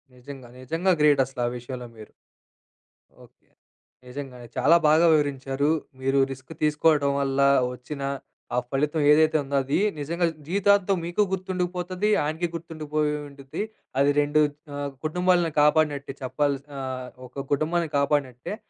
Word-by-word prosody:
నిజంగా. 130 0 -11
నిజంగా 165 +9 0
గ్రేటసల, 140 -3 +3
ఆ - - 0
విషయంలో 125 0 -7
మీరు. 110 -1 -12 1.1
ఓకే. - - -29 0.6
నిజంగానే. 125 -2 -8
చాలా 140 +6 +5
బాగా 155 +3 +5
వివరించారు. 140 -1 0 0.3
మీరు 135 +1 +2
రిస్క్ 130 +3 -9
తీసుకోవటం 150 -1 +3
వల్ల 135 0 -1 0.3
ఒచ్చిన 140 +3 -8 0.5
ఆ - - +1
ఫలితం 150 +3 0
ఏదైతే 155 +1 +5
ఉందో, 140 +1 -4
అది 135 +5 0 0.2
నిజంగా 170 +4 -1 0.2
జీవితాంతం 200 +1 +3
మీకు 175 +4 0
గుర్తుండుకుపోతది. 185 +1 -2
ఆయనకి 155 +4 -1
గుర్తుండిపోయి 155 -2 -2 0.2
ఉండిద్ది. 140 +6 -6 0.4
అది 140 +1 +4
2 145 +1 +2 0.3
ఆహ్, 145 0 -3
కుటుంబాలను 180 +1 +2
కాపాడినట్టే 150 -2 +2
చెప్పాల్సినా 140 +1 -2 0.5
ఒక 135 +2 -7
కుటుంబాన్ని 160 +3 0
కాపాడినట్టే. 140 - -1
145 Hz, 120 wpm, -25 LUFS, 135-165 Hz, 1.1 s, చాలా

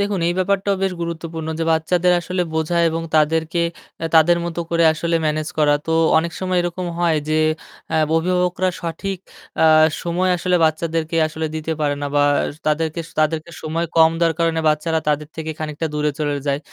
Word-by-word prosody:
দেখুন 200 -2 0
এই 175 - 0
ব্যাপারটাও 195 +1 +1
বেশ 190 -1 +1
গুরুত্বপূর্ণ 165 -1 -5
যে 165 - 0
বাচ্চাদের 175 +3 +2
আসলে 180 +1 -2
বোঝা 160 +2 0
এবং 165 +1 -3
তাদেরকে 160 +2 +1 0.4
আ - - -1
তাদের 165 +2 +5
মতো 170 0 -3
করে 170 0 +3
আসলে 165 +1 -1
ম্যানেজ 155 0 -1
করা 150 -1 +4
তো 160 - 0 0.3
অনেক 170 +1 -2
সময় 185 -1 0
এরকম 175 +1 -3
হয় 170 -3 +2
যে 155 0 +2 0.5
আ - - 0 0.2
অভিভাবকরা 180 +2 +1
সঠিক 175 +3 -4 0.4
আ - - +6 0.4
সময় 175 +2 0
আসলে 180 +1 +1
বাচ্চাদেরকে 160 +1 -1
আসলে 160 +1 -4
দিতে 155 +1 -3
পারে 145 -1 +1
না - - -1
বা 145 - +4 0.4
তাদেরকে 160 +2 0 0.2
তাদেরকে 155 +2 0
সময় 165 +2 -2
কম 160 0 +7
দেওয়ার 165 -1 +2
কারণে 165 -1 +1
বাচ্চারা 160 +2 +1
তাদের 150 0 0
থেকে 160 0 -4
খানিকটা 155 +1 -3
দূরে 150 0 +1
চলে 145 -2 -1
যায়। 140 0 +1
165 Hz, 175 wpm, -20 LUFS, 155-175 Hz, 0.5 s, কম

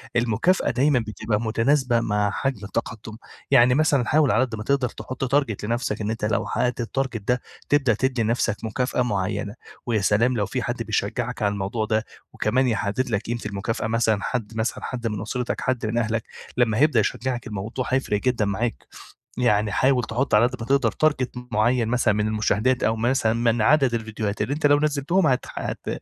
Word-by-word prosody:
المكافأة 120 - +2
دايمًا 135 +2 +3
بتبقى 110 0 -2
متناسبة 120 +2 +2
مع 105 -2 0
حجم 125 -5 -2
التقدّم، 110 +2 -5 0.3
يعني 125 +1 +6
مثلًا 145 -4 +2
حاول 150 0 +3
على 110 +5 +3
قدّ 120 -4 -3
ما 105 - -6
تقدر 135 0 +1
تحط 130 +2 -3
target 140 -7 +2
لنفسك، 115 0 -2
أنت 110 +1 -2
لو 105 -2 0
حققت 125 0 -1
الtarget 125 0 -2
ده 125 0 +1 0.3
تبدأ 140 -5 +3
تدّي 125 +1 0
نفسك 115 -1 +1
مكافأة 125 +3 -1
معيّنة، 105 -2 -2 0.3
ويا 115 -3 +1
سلام 115 +5 +2
لو 105 - +1
في - - -3
حد - - -3
بيشجعك 120 0 -2
على 105 -1 +2
الموضوع 100 +3 -2
ده 110 0 0 0.3
وكمان 130 +1 +1
يحدد 110 +3 -1
لك 105 -3 0
قيمة 120 +1 -4
المكافأة، 105 +2 -3
مثلًا 110 -2 +1
حد 115 -3 -3
مثلًا 110 +1 -2
حد 120 -2 -3
من 105 -2 -3
أسرتك، 125 -2 -3
حد 130 -3 -1
من 110 +2 -1
أهلك، 115 -1 0 0.3
لمّا 115 -3 +2
هيبدأ 140 -3 +4
يشجعك 120 +4 -2
الموضوع 110 +4 -4
هيفرق 130 -5 0
جدًا 125 -3 +1
معاك. 110 +3 -2 0.5
يعني 105 -4 +2
حاول 130 +3 +2
تحط 120 +5 -2
على 105 +3 +6
قدّ 125 - -6
ما 115 - -5
تقدر 140 0 +2
target 135 -5 +1 0.2
معيّن 115 +2 +2
مثلًا 120 -3 +2
من 105 +1 0
المشاهدات، 110 +4 +1
أو 110 - +2
مثلًا 115 0 +1
من 115 0 +1
عدد 135 0 +4
الڤيديوهات 110 -2 -3
اللي 140 - 0
أنت 150 +1 -2
لو 145 0 +5
نزلتهم 150 +4 +1
هت 130 -2 +1
هت - - -5
120 Hz, 185 wpm, -24 LUFS, 110-130 Hz, 0.5 s, يعني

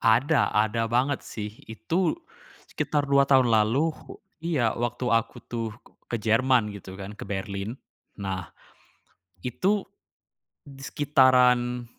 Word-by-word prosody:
Ada, 125 +7 +3
ada 110 +2 +1
banget 130 +4 +1
sih. 105 -1 -6 0.2
Itu 165 +12 -1 0.5
sekitar 145 -2 -1
2 140 0 +5
tahun 130 -3 +5
lalu, 115 +8 +3 0.5
iya 140 -10 +1
waktu 120 +1 -2
aku 115 -1 +1
tuh 115 -2 -4 0.3
ke 120 - -2
Jerman 115 +1 +3
gitu 95 -2 -10
kan, 100 +2 -8
ke - - -8
Berlin. 100 +2 -4 0.5
Nah, 95 -4 -4 0.9
itu 190 - 0 0.8
sekitaran 130 -3 +2
120 Hz, 110 wpm, -26 LUFS, 110-135 Hz, 0.9 s, 2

